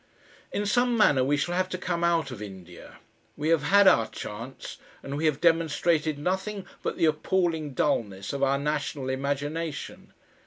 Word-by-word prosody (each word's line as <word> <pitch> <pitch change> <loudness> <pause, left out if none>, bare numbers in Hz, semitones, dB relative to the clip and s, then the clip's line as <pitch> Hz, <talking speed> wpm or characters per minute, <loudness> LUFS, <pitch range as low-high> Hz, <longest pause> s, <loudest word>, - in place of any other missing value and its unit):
In 205 - -2
some 245 +3 +2
manner 145 - +4
we 145 +3 +2
shall 175 +4 -1
have 185 +1 0
to 185 - -3
come 175 -1 -2
out 165 -5 +1
of 115 -4 -8
India. 95 -4 -10 0.4
We 150 +2 -1
have 165 -3 +4
had 200 +5 +5
our 115 -10 +5
chance, 115 +6 -8 0.2
and 140 - -5
we 155 +3 -1
have 150 -2 +2
demonstrated 165 -2 +2
nothing 190 +5 -2 0.2
but - - -3
the - - +3
appalling 160 -2 0
dulness 100 -9 -1
of 140 - -3
our 135 0 +3
national 140 -2 -2
imagination. 145 +4 -4
155 Hz, 165 wpm, -27 LUFS, 135-175 Hz, 0.4 s, had